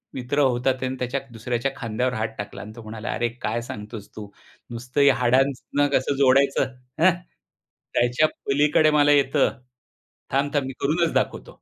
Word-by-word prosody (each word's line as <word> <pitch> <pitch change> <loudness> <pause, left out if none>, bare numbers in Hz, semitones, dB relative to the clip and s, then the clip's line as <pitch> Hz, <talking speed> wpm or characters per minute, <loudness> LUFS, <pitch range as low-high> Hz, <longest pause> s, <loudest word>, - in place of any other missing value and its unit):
मित्र 130 +3 -2
होता 130 -1 +2
त्याने 130 0 -3
त्याच्या 125 +2 -2
दुसऱ्याच्या 120 +3 -2
खांद्यावर 125 +2 -2
हात 110 -2 -2
टाकला 105 - -6
आणि 105 - -9
तो 115 - -9
म्हणाला, 110 +1 -7
"अरे, 120 - 0
काय 115 +3 -1
सांगतोस 105 -2 -8
तू 105 -1 -7 0.4
नुसतं 125 +4 -2
या 140 -2 +6
हाडांना 135 +3 +1
कसं 130 +2 -1
जोडायचं 140 +1 +4 0.4
हं, 180 0 +5 0.8
त्याच्या 120 +6 +3 0.2
पलीकडे 150 +2 +3
मला 145 -1 +4
येतं, 140 0 +2 0.7
थांब, 140 +2 +1
थांब, 140 -2 +1
मी 135 - -5
करूनच 165 +4 +1
दाखवतो." - - -2
130 Hz, 155 wpm, -24 LUFS, 120-140 Hz, 0.8 s, या